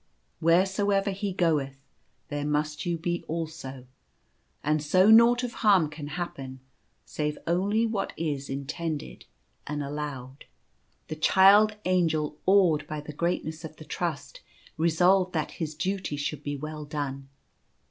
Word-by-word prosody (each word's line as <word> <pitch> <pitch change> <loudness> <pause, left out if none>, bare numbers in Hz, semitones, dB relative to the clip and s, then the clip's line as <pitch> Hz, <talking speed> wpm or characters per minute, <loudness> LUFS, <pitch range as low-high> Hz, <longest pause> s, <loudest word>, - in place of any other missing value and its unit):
Wheresoever 195 +4 +2
he 195 +1 -3
goeth, 155 -7 0 0.5
there 145 -1 -3
must 150 +2 -1
you 170 -1 0
be 175 +1 -2
also; 155 -5 -5 0.8
and 150 0 +1
so 185 +8 +4
naught 235 +2 +6
of 245 - -3
harm 190 -8 +4
can 150 -1 -7
happen 135 -7 -6 0.2
— - - -44
save 150 -1 -3
only 200 +6 +1
what 220 -3 -2
\s 145 -4 -3
in 135 +1 -4
tended 155 - -5 0.4
and 150 0 -3
allowed." 140 -2 -6 0.6
The 155 - -5
Child 200 +6 +6
Angel, 160 -5 +1
awed 175 -7 +4
by 155 - -4
the 150 +1 -8
greatness 160 0 -2
of 155 -1 -8
the 155 - -12
trust, 175 - -4 0.3
resolved 180 +3 +3
that 155 -3 -1
his 155 -1 -3
duty 185 -3 -2
should 145 0 -3
be 145 -1 -4
well 155 +1 -6
done. 140 -2 -5
160 Hz, 140 wpm, -27 LUFS, 150-185 Hz, 0.8 s, naught